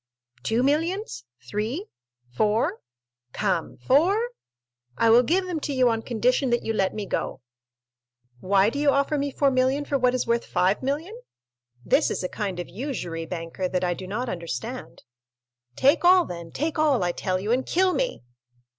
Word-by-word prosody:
"Two 230 Hz, +3 st, +1 dB
millions?—three?—four? 215 Hz, -, -2 dB, 0.5 s
Come, 165 Hz, -, -1 dB
four? 385 Hz, -, +2 dB, 0.7 s
I 230 Hz, -, +4 dB
will 235 Hz, +2 st, +8 dB
give 355 Hz, +9 st, +1 dB
them 355 Hz, -3 st, -3 dB
to 290 Hz, -, -4 dB
you 255 Hz, -2 st, +4 dB
on 225 Hz, -1 st, 0 dB
condition 250 Hz, +3 st, +1 dB
that 240 Hz, 0 st, +1 dB
you 225 Hz, -, -1 dB
let 195 Hz, -3 st, 0 dB
me 210 Hz, -1 st, -3 dB
go." -, -, -3 dB, 1.0 s
"Why 195 Hz, -, +3 dB
do 280 Hz, -, -4 dB
you 295 Hz, -1 st, +3 dB
offer 280 Hz, +2 st, +2 dB
me 285 Hz, 0 st, -1 dB
4,000,000 270 Hz, +1 st, +2 dB
for 280 Hz, -1 st, 0 dB
what 250 Hz, 0 st, +3 dB
is 255 Hz, -, 0 dB
worth 235 Hz, 0 st, -1 dB
5,000,000? 265 Hz, -, 0 dB, 0.7 s
This -, -, +3 dB
is -, -, -3 dB
a 180 Hz, -, -2 dB
kind 195 Hz, -4 st, -4 dB
of 175 Hz, -, -4 dB
usury, 175 Hz, -, -5 dB
banker, 175 Hz, +1 st, -4 dB
that 180 Hz, 0 st, -1 dB
I 175 Hz, -1 st, +1 dB
do 185 Hz, +1 st, -8 dB
not 235 Hz, +6 st, -3 dB
understand." 175 Hz, -, -6 dB, 0.7 s
"Take 280 Hz, +6 st, +3 dB
all, 360 Hz, 0 st, +6 dB
then—take 180 Hz, -, -4 dB
all, 290 Hz, -9 st, +3 dB
I 175 Hz, -, +1 dB
tell 185 Hz, +1 st, -2 dB
you, 205 Hz, +4 st, -2 dB
and 255 Hz, +2 st, +2 dB
kill 370 Hz, +5 st, +2 dB
me!" -, -, -2 dB
240 Hz, 160 wpm, -25 LUFS, 185-285 Hz, 1.0 s, will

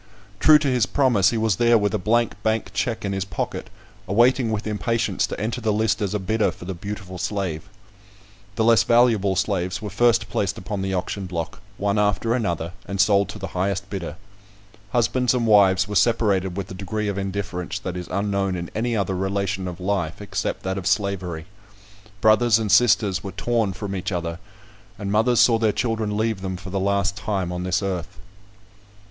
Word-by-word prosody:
True 155 Hz, -1 st, +7 dB
to 150 Hz, -1 st, -1 dB
his 125 Hz, -4 st, +2 dB
promise, 120 Hz, -9 st, +3 dB
he 115 Hz, -, -1 dB
was 110 Hz, -3 st, +1 dB
there 120 Hz, -1 st, +5 dB
with 105 Hz, -2 st, 0 dB
a -, -, 0 dB
blank 115 Hz, +4 st, +1 dB
bank 110 Hz, 0 st, -1 dB
check 100 Hz, +3 st, -2 dB
in 100 Hz, -, -1 dB
his 95 Hz, -1 st, -1 dB
pocket, 95 Hz, -, -4 dB, 0.4 s
awaiting 120 Hz, +3 st, +3 dB
with 110 Hz, 0 st, -2 dB
impatience 110 Hz, +2 st, 0 dB
to -, -, -6 dB
enter 115 Hz, +4 st, -2 dB
the 110 Hz, -1 st, +1 dB
list 110 Hz, +1 st, +1 dB
as 100 Hz, 0 st, -1 dB
a -, -, 0 dB
bidder 110 Hz, +3 st, +1 dB
for -, -, -9 dB
the 95 Hz, -, -4 dB
beautiful 95 Hz, 0 st, -7 dB
slave. 95 Hz, -7 st, -3 dB, 0.9 s
The 110 Hz, -, +1 dB
less 115 Hz, 0 st, +5 dB
valuable 115 Hz, -5 st, +3 dB
slaves 95 Hz, -1 st, -1 dB
were 105 Hz, -2 st, -6 dB
first 115 Hz, 0 st, +3 dB
placed 100 Hz, 0 st, -1 dB
upon 100 Hz, +1 st, -4 dB
the 95 Hz, 0 st, -1 dB
auction 95 Hz, +2 st, -3 dB
block, 85 Hz, -1 st, -5 dB, 0.2 s
one 100 Hz, +1 st, 0 dB
after 105 Hz, +3 st, +1 dB
another, 85 Hz, -8 st, -2 dB
and 100 Hz, +1 st, -4 dB
sold 100 Hz, 0 st, +4 dB
to -, -, -7 dB
the 95 Hz, -2 st, -6 dB
highest 95 Hz, +1 st, -2 dB
bidder. 95 Hz, -4 st, -4 dB, 0.7 s
Husbands 125 Hz, +2 st, +1 dB
and 120 Hz, -2 st, 0 dB
wives 100 Hz, -3 st, +5 dB
were 105 Hz, -, -5 dB
separated 100 Hz, -4 st, +2 dB
with 95 Hz, -1 st, -5 dB
a -, -, -5 dB
degree 105 Hz, +3 st, -3 dB
of 100 Hz, -1 st, -2 dB
indifference 95 Hz, -2 st, -4 dB
that 90 Hz, -1 st, -5 dB
is 90 Hz, -1 st, -5 dB
unknown 100 Hz, -1 st, -1 dB
in 85 Hz, -1 st, -5 dB
any 115 Hz, +1 st, -1 dB
other 95 Hz, -2 st, -1 dB
relation 95 Hz, 0 st, -2 dB
of 90 Hz, 0 st, -6 dB
life, 90 Hz, -2 st, -2 dB
except 105 Hz, -, -3 dB
that 95 Hz, +1 st, -2 dB
of 90 Hz, -, -4 dB
slavery. 90 Hz, -6 st, -1 dB, 0.8 s
Brothers 110 Hz, +1 st, +5 dB
and 110 Hz, -3 st, -1 dB
sisters 105 Hz, -4 st, +4 dB
were 95 Hz, -, -6 dB
torn 115 Hz, -4 st, 0 dB
from 100 Hz, +1 st, -5 dB
each 95 Hz, +1 st, -3 dB
other; 85 Hz, -2 st, -3 dB, 0.6 s
and 100 Hz, -1 st, -4 dB
mothers 115 Hz, +3 st, +3 dB
saw 115 Hz, -2 st, +4 dB
their 110 Hz, -2 st, +3 dB
children 110 Hz, -2 st, -1 dB
leave 110 Hz, -2 st, -1 dB
them 95 Hz, -1 st, -4 dB
for 95 Hz, 0 st, -9 dB
the 100 Hz, -, -1 dB
last 100 Hz, 0 st, +1 dB
time 95 Hz, -4 st, -2 dB
on 90 Hz, 0 st, -4 dB
this 90 Hz, +2 st, 0 dB
earth. 95 Hz, 0 st, -4 dB
100 Hz, 195 wpm, -23 LUFS, 95-110 Hz, 0.9 s, True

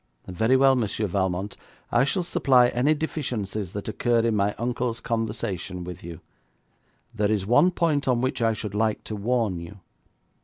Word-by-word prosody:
'Very 110 Hz, +8 st, +2 dB
well, 135 Hz, 0 st, +5 dB
Monsieur 110 Hz, -3 st, -1 dB
Valmont, 95 Hz, +1 st, -2 dB, 0.4 s
I 120 Hz, +3 st, +4 dB
shall 180 Hz, +6 st, 0 dB
supply 130 Hz, -7 st, +4 dB
any 135 Hz, +6 st, +2 dB
deficiencies 110 Hz, -, -3 dB
that 100 Hz, -, -5 dB
occur 115 Hz, +2 st, +1 dB
in 115 Hz, -1 st, +1 dB
my 100 Hz, 0 st, +1 dB
uncle's 120 Hz, 0 st, -2 dB
conversation 105 Hz, -5 st, -3 dB
with 90 Hz, -1 st, -8 dB
you. 85 Hz, -1 st, -9 dB, 0.9 s
There 105 Hz, -2 st, 0 dB
is 105 Hz, -3 st, 0 dB
one 145 Hz, -, +5 dB
point 165 Hz, -6 st, 0 dB
on 125 Hz, -2 st, +2 dB
which 130 Hz, 0 st, -1 dB
I 115 Hz, -1 st, +3 dB
should 105 Hz, -2 st, -5 dB
like 110 Hz, +1 st, 0 dB
to 110 Hz, -, -5 dB
warn 105 Hz, -3 st, 0 dB
you. 85 Hz, +4 st, -10 dB
110 Hz, 165 wpm, -25 LUFS, 100-125 Hz, 0.9 s, well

